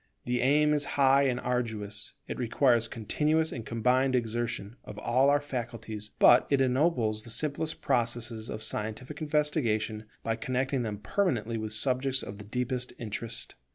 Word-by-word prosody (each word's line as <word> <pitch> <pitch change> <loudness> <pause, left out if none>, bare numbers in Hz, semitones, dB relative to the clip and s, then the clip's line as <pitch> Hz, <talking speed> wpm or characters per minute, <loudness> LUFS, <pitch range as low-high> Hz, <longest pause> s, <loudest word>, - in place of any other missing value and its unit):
The 125 0 0
aim 150 +3 +4
is 145 -1 +1
high 140 0 +5
and 125 -1 0
arduous; 110 -5 -3
it - - -5
requires 120 -1 +3
continuous 155 +9 0
and 115 - -5
combined 125 +4 +2
exertion 115 -1 -2
of 105 - -10
all 125 +6 +3
our 145 0 +4
faculties; 115 -6 -5
but 120 - +6
it 140 - +3
ennobles 125 -5 +2
the 115 - -11
simplest 155 +5 -2
processes 120 -3 -1
of 110 - -5
scientific 110 +8 -4
investigation 140 -8 0 0.2
by 115 0 -1
connecting 130 +3 -1
them 110 -3 -3
permanently 115 - 0
with 110 0 -4
subjects 130 +3 +1
of 100 +1 -8
the 105 - -9
deepest 125 +3 -3
interest. 115 0 -4
120 Hz, 155 wpm, -29 LUFS, 110-135 Hz, 0.2 s, but